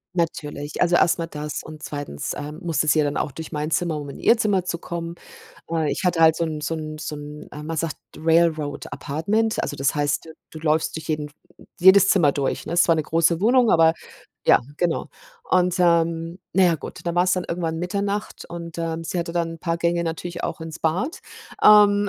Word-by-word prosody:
Natürlich, 150 -3 -3
also, 175 -1 +3
erst 175 - +4
mal 165 - -2
das 150 -2 -5
und 155 -1 -11
2., 145 - -5
äh, 145 +1 -6
musste 160 -2 -1
sie 155 - +4
ja 150 - +3
dann 145 - -1
auch 145 - -1
durch 160 +2 -8
meine 150 +1 -3
Zimmer, 160 -1 0
um 145 -1 -7
in - - -9
ihr 230 - +4
Zimmer 200 -5 +1
zu 170 -2 -3
kommen. 170 0 -6 0.6
Äh, 160 -2 0
ich - - -4
hatte 175 -2 +2
halt 160 -1 +7
so 170 - -1
'n 155 -1 -5
so 165 +3 -2
'n 155 0 -6
so 155 - -5
'n, 150 +1 -9
äh, 150 - -7
man 160 +1 -4
sagt 160 0 -2 0.2
Rail 165 +1 +4
Road 150 -3 -5
Apartment. 205 +10 -1
Also, - - -3
das 135 +2 +1
heißt, 145 +2 -1 0.2
du 160 - -9
läufst 155 +1 +1
durch 160 0 -7
jeden 150 -1 -1
f 145 - -15 0.5
jedes 190 +2 +7
Zimmer 170 -9 +4
durch, 140 -2 -2
ne? - - -5
Es 175 0 +4
war 165 - +6
'ne 155 - 0
große 165 +1 +2
Wohnung, 245 0 +4
aber 160 -1 +5 0.5
ja, - - +6 0.2
genau, 175 -2 0 0.4
und, 180 -1 +3
ähm, 170 0 +2 0.2
na 190 - +5
ja, 170 -2 +4
gut, - - -9
dann 170 - -2
war's 180 +1 +3
dann 180 -1 0
irgendwann 165 -2 -2
Mitternacht 200 +4 -3
und, 170 -1 -7
ähm, 165 0 -3
sie 175 - -3
hatte 170 0 -3
dann 170 -1 -1
'n 165 - -10
paar 170 0 -1
Gänge 170 0 0
natürlich 170 +1 -4
auch - - -3
ins 160 0 -7
Bad, 185 - -1 0.4
ähm, 205 -1 +7
165 Hz, 220 wpm, -23 LUFS, 155-175 Hz, 0.6 s, halt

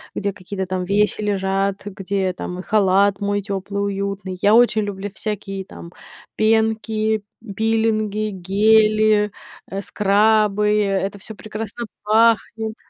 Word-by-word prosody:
где 200 0 -1
какие-то 190 0 -6
там 185 -1 -2
вещи 210 +2 +1
лежат, 195 -1 -1
где 195 -1 -2
там 180 0 -6
халат 200 0 +2
мой 205 0 -1
тёплый, 200 +1 -4
уютный. 200 -2 -3
Я 205 +2 +4
очень 230 -2 +4
люблю 200 0 -5
всякие 195 -2 -5
там 170 -2 -11 0.4
пенки, 220 -1 +1 0.3
пилинги, 215 -1 0
гели, 215 +2 +3 0.4
э, 195 +1 -3
скрабы- 210 0 +2
это 195 0 -1
всё 220 +2 -10
прекрасно 215 +2 -6 0.2
пахнет. 220 0 +2
205 Hz, 115 wpm, -20 LUFS, 195-215 Hz, 0.4 s, Я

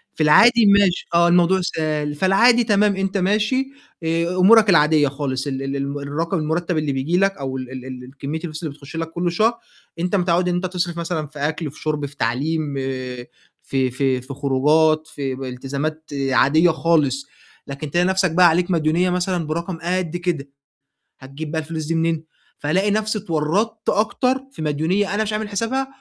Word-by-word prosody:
في 155 - 0
العادي 230 +9 +6
ماشي 200 -3 +3
آه، 170 0 +5
الموضوع 175 +2 +4
سهل، 155 -4 -2
فالعادي 230 +8 +4
تمام 210 -2 +2
أنت 195 +1 -1
ماشي 215 +8 +1 0.4
آآ 165 +2 0
أمورك 210 +3 +6
العادية 150 -3 +4
خالص، 135 -1 -3
ال 135 -1 -3
ال 135 0 -3
ال 140 +1 -3
الرقم 160 +6 -2
المُرتب 165 +2 -1
اللي 155 -2 0
بييجي 140 +7 0
لَك 195 -1 +1
أو 130 -1 -4
ال 130 -1 -6 0.2
ال 130 -1 -8
الكمية 140 +4 -6
الفلوس 160 -1 -7
اللي 155 -3 -4
بتخش 140 +2 -12
لَك 165 0 -4
كل 175 +1 -1
شهر 220 +7 +2 0.5
أنت 180 +3 0
متعوّد 180 -1 +1
إن 175 - 0
أنت 180 +1 -2
بتصرف 175 -2 -3
مثلًا 165 -2 -3
في 150 0 -12
أكْل، 150 +1 -2
في 150 - -15
شُرب، 150 -2 -2
في 140 +1 -10
تعليم، 145 +5 -1
آآ 130 -2 -5 0.4
في 130 -2 0
في 130 0 0
في 130 +2 -8
خروجات، 150 +3 +2
في 135 -4 -4
ب 135 - -7
التزامات 140 +5 -5 0.2
عادية 155 +6 +4
خالص، 150 -4 +1 0.4
لكن 140 +1 -6
تلاقي 175 +3 +2
نَفْسك 190 -2 +1
بقى 180 +2 +6
عليك 175 +3 +1
مديونية 165 +2 +2
مثلًا، 180 -2 -1
برقم 170 +3 -3
قد 175 -1 -2
كده، 170 -6 -3 0.7
هتجيب 140 +3 -8
بقى 160 -1 -1
الفلوس 155 0 -5
دي 165 +2 -1
منين، 165 -1 0 0.3
فالاقي 190 +8 0
نَفْسي 215 +1 0
اتورّطت 200 +6 -1
أكتر 240 +4 +1 0.2
في 215 - -9
مديونية 160 +7 0
أنا 215 - +1
مش 215 0 -3
عامل 215 0 -3
حِسابها 230 +6 -1
160 Hz, 180 wpm, -21 LUFS, 145-185 Hz, 0.7 s, العادي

